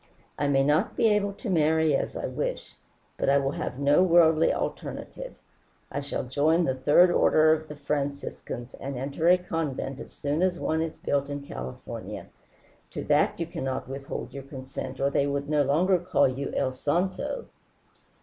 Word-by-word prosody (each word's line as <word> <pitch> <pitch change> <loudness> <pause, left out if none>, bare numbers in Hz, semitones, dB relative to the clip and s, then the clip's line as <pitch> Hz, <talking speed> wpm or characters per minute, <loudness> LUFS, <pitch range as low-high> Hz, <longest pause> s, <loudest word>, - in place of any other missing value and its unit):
I 145 - +1
may 135 -1 +3
not 150 +2 +1
be 225 - +4
able 205 -1 +1
to 235 - -8
marry 160 -4 +3
as - - -2
I - - -3
wish, - - -4 0.4
but - - 0
I 140 - +5
will 135 -1 0
have 130 - -4
no 145 +4 +4
worldly 165 -3 +5
alternative. - - -5 0.6
I 145 - -2
shall 140 0 -3
join 150 +7 +2
the 130 - +1
Third 150 +7 +5
Order 155 -2 +5
of 155 0 -3
the 150 - -8
Franciscans, 140 -3 -4
and 135 -1 -5
enter 140 +6 0
a 180 - +7
convent 155 -6 -3
as - - -9
soon 145 +3 -2
as 185 -1 +2
one 160 0 0
is 160 -1 -3
built 140 0 -1
in 145 0 -4
California. 65 - -7 0.6
To - - -5
that - - +2
you 170 - -1
cannot 155 -6 -4
withhold 135 +1 -6
your 140 - -6
consent, 135 -1 -7
or 140 +1 +1
they 140 - +2
no 145 +1 0
longer 165 +7 +3
would 175 +1 -12
call 185 - +4
you 135 +2 -3
El 130 -1 +1
santo." 180 - -1
145 Hz, 180 wpm, -27 LUFS, 140-170 Hz, 0.6 s, a